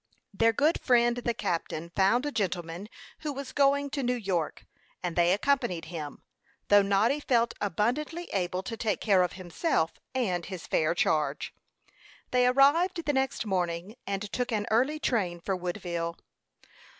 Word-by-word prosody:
Their 225 +3 +4
good 295 +8 +2
friend 240 -1 +3
the 240 -1 -1
captain 170 -2 -3
found 210 +7 +3
a 290 - -1
gentleman 185 - -3 0.3
who 305 -2 -3
was 275 -1 -6
going 280 0 +2
to 280 - -2
New 250 -1 +1
York, 190 -8 -2 0.4
and 175 -2 -2
they 175 0 +4
accompanied 200 -6 +1
him, 150 -3 -6 0.5
though 205 0 +7
Noddy 200 +8 +2
felt 235 -5 +2
abundantly 245 - -1
able 185 -1 -1
to 225 - -5
take 220 -2 -1
care 195 -4 +4
of 180 - 0
himself 175 - -1 0.2
and 185 -9 0
his 185 -3 -7
fair 160 +2 +1
charge. 150 -4 0 0.8
They 250 0 +4
arrived 320 +7 +4
the 290 - +1
next 265 -3 0
morning, 180 +1 -2
and 200 0 -2
took 250 -1 -2
an 210 -2 0
early 260 +7 +2
train 195 - 0
for 190 +3 -2
Woodville. 175 -2 -3
210 Hz, 155 wpm, -28 LUFS, 175-255 Hz, 0.8 s, though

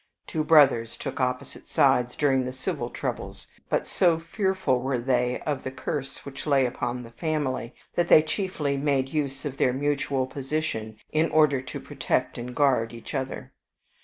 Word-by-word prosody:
Two 155 - -2
brothers 135 -8 +5
took - - -5
opposite 125 -1 -2
sides 125 0 +3
during 135 -3 +2
the 125 - -3
civil 130 0 -3
troubles; - - -5 0.2
but - - +1
so 170 -3 +3
fearful 190 - 0
were 130 +1 -1
they 125 0 +1
of 145 -3 -2
the - - -3
curse 135 +1 -5
which 140 +2 -7
lay 140 -3 +4
upon 125 0 -3
the 115 - -11
family, 140 -5 -2 0.2
that 175 0 +1
they 155 - +7
chiefly 155 -4 -1
made 135 -2 +1
use 140 -2 -2
of 140 -2 -4
their 125 - +3
mutual 140 -1 0
position 130 -6 -3
in 155 +2 +2
order 150 -4 +4
to 130 - -7
protect - - -1
and 125 +1 -6
guard 125 -5 +2
each 115 - -9
other. 135 -2 -4
135 Hz, 165 wpm, -26 LUFS, 125-150 Hz, 0.2 s, they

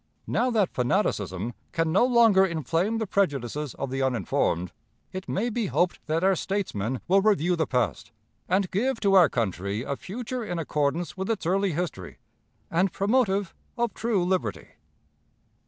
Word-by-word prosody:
Now 250 - +1
that 215 -6 +1
fanaticism 120 - 0 0.2
can 165 -1 +1
no 190 - +4
longer 235 -6 +5
inflame 170 - 0
the 225 - -1
prejudices 150 - -1
of 135 -1 -4
the 135 0 -2
uninformed, 95 -8 0 0.4
it 185 0 -7
may 235 +5 -1
be 225 -2 -1
hoped 175 0 0
that 160 +2 0
our 190 0 +4
statesmen 130 - -2
will 195 +2 +4
review 185 -4 +2
the 160 -3 0
past, 125 -1 -1 0.4
and 190 +1 +1
give 230 +5 0
to 200 -2 +3
our 180 -6 +7
country 100 -1 -2
a 140 - -3
future 240 - -5
in 175 -5 -4
accordance 155 +2 -1
with 190 +2 -3
its 220 -6 -1
early 190 +1 +1
history, 150 - -4 0.5
and 185 +3 +2
promotive 200 -3 +1 0.2
of 235 -2 0
true 220 -5 0
liberty. 115 - -1
180 Hz, 155 wpm, -26 LUFS, 135-200 Hz, 0.5 s, our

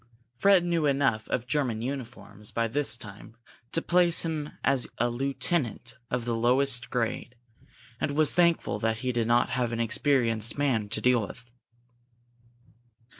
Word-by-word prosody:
Fred 195 +3 +4
knew 170 -3 +1
enough 135 -6 +1
of 120 - -2
German 125 -4 -1
uniforms 120 -5 -6
by 115 0 -1
this 120 -1 +1
time 105 +1 -12 0.3
to 165 - +1
place 175 -1 +3
him 155 -2 -3
as 135 -2 +2
a 120 +1 +1
lieutenant 135 - -2
of 125 -2 -2
the 120 -1 -1
lowest 125 +1 +2
grade, 120 +1 -3 0.6
and 140 - -2
was 155 -1 +2
thankful 170 -12 +2
that 115 +1 0
he 125 - +1
did 120 -2 -1
not 120 +1 +3
have 120 0 -1
an 115 - -3
experienced 115 -1 +1
man 125 -8 0
to 110 - -2
deal 125 -2 +3
with. 120 +3 -9
125 Hz, 150 wpm, -27 LUFS, 115-145 Hz, 0.6 s, Fred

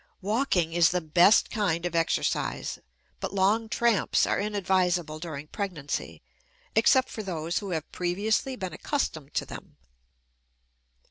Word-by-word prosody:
Walking 200 -6 +1
is 170 -2 +5
the 180 - 0
best 175 +6 +4
kind 180 -6 0
of 175 - -2
exercise, 165 0 -1 0.4
but - - -4
long 210 +4 +2
tramps 235 -3 +2
are - - 0
inadvisable 180 -6 0
during 155 -4 -6
pregnancy, 150 - -5 0.5
except 255 +4 +4
for 220 - -5
those 170 -4 -2
who 200 - -6
have 160 -4 -4
previously 205 +8 -1
been 185 -5 -5
accustomed 155 - -3
to - - 0
them. - - -11
180 Hz, 130 wpm, -27 LUFS, 165-210 Hz, 0.5 s, is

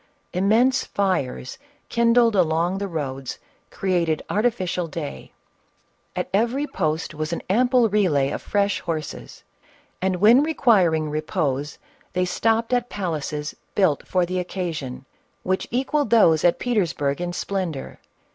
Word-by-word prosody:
Immense 225 +8 +3
fires, 185 -10 -2 0.3
kindled 235 -1 +3
along 175 +1 +2
the 200 - -2
roads, 135 -6 -4 0.3
created 170 -5 0
artificial 185 -6 0
day; 70 - -7 0.8
at - - -2
every 240 +8 +1
post 160 - -2
was 155 +1 -4
an 170 - -3
ample 245 +2 +4
relay 175 -10 +2
of - - -4
fresh 200 0 0
horses; 160 -3 -6 0.6
and 190 0 +1
when 220 +8 +6
requiring 195 - +3
repose 150 -3 -2 0.4
they 180 0 +1
stopped 225 +6 +1
at 245 0 +1
palaces, 155 -6 -3 0.2
built 185 -8 +2
for 180 -1 +2
the 185 +1 -2
occasion, 165 -8 -4 0.4
which 185 0 -1
equalled 270 +2 0
those 170 -9 +5
at 175 - +4
Petersburg 175 - 0
in 175 0 -2
splendor. 175 -6 -4
185 Hz, 125 wpm, -23 LUFS, 155-220 Hz, 0.8 s, when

